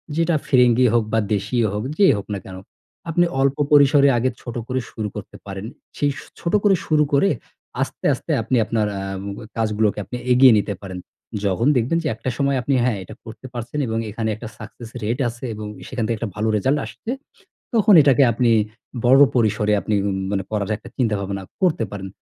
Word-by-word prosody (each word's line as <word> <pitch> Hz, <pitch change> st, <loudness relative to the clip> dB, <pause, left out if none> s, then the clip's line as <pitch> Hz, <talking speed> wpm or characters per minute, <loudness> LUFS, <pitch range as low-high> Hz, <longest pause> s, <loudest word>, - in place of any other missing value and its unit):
যেটা 165 Hz, 0 st, +2 dB
ফিরিঙ্গি 125 Hz, -1 st, +4 dB
হোক 120 Hz, -1 st, +3 dB
বা 115 Hz, -, +4 dB
দেশীই 115 Hz, +4 st, 0 dB
হোক। 105 Hz, +1 st, -3 dB
যেই 195 Hz, -9 st, +6 dB
হোক 100 Hz, -, -6 dB
না -, -, -2 dB
কেনো? 95 Hz, -1 st, -9 dB, 0.5 s
আপনি 175 Hz, +2 st, +3 dB, 0.2 s
অল্প 135 Hz, 0 st, +2 dB
পরিসরে 145 Hz, -1 st, +6 dB
আগে 125 Hz, +2 st, +1 dB
ছোট 120 Hz, -, -7 dB
করে 130 Hz, 0 st, -1 dB
শুরু 110 Hz, -1 st, -4 dB
করতে -, -, -8 dB
পারেন। 95 Hz, 0 st, -6 dB, 0.3 s
সেই 145 Hz, -1 st, +1 dB, 0.3 s
ছোট 170 Hz, -, -3 dB
করে 200 Hz, -2 st, +5 dB
শুরু 155 Hz, -1 st, +3 dB
করে 140 Hz, +8 st, +4 dB, 0.5 s
আস্তে, -, -, -4 dB
আস্তে -, -, -5 dB
আপনি 115 Hz, +4 st, -1 dB
আপনার 110 Hz, -1 st, 0 dB
আ -, -, -4 dB, 0.6 s
কাজগুলোকে 110 Hz, -2 st, 0 dB
আপনি 125 Hz, -, -6 dB
এগিয়ে 125 Hz, 0 st, +7 dB
নিতে 100 Hz, 0 st, -2 dB
পারেন। 95 Hz, -2 st, -6 dB, 0.5 s
যখন 100 Hz, +6 st, +1 dB
দেখবেন 125 Hz, +8 st, +1 dB
যে -, -, -1 dB
একটা 120 Hz, -, -4 dB
সময় 140 Hz, -1 st, +1 dB
আপনি 140 Hz, -, -1 dB
হ্যাঁ, 120 Hz, -4 st, +1 dB
এটা -, -, -11 dB
করতে 115 Hz, +3 st, -11 dB
পারছেন 120 Hz, +4 st, -5 dB
এবং 110 Hz, 0 st, -2 dB
এখানে 110 Hz, +1 st, -3 dB
একটা 110 Hz, +2 st, -8 dB
সাকসেস 115 Hz, -2 st, -10 dB
রেট 115 Hz, +5 st, -1 dB
আছে 120 Hz, +2 st, -12 dB
এবং 105 Hz, 0 st, -7 dB, 0.2 s
সেখান 125 Hz, -3 st, -3 dB
থেকে 115 Hz, -, 0 dB
একটা 115 Hz, 0 st, -4 dB
ভালো 110 Hz, +1 st, -1 dB
রেজাল্ট 130 Hz, +8 st, +1 dB
আসছে, -, -, -10 dB, 0.7 s
তখন 215 Hz, -2 st, +5 dB
এটাকে 140 Hz, 0 st, +4 dB
আপনি 120 Hz, +1 st, +2 dB, 0.6 s
বড় 130 Hz, +3 st, +6 dB
পরিসরে 110 Hz, -3 st, +2 dB
আপনি 105 Hz, -, -2 dB, 0.4 s
মানে 100 Hz, -1 st, -1 dB
পড়ার 105 Hz, -2 st, -2 dB
একটা 120 Hz, -, -13 dB
চিন্তা 115 Hz, -5 st, +1 dB
ভাবনা 100 Hz, 0 st, -4 dB, 0.2 s
করতে 175 Hz, -9 st, +2 dB
পারেন। 95 Hz, -1 st, -6 dB
120 Hz, 190 wpm, -21 LUFS, 105-140 Hz, 0.7 s, এগিয়ে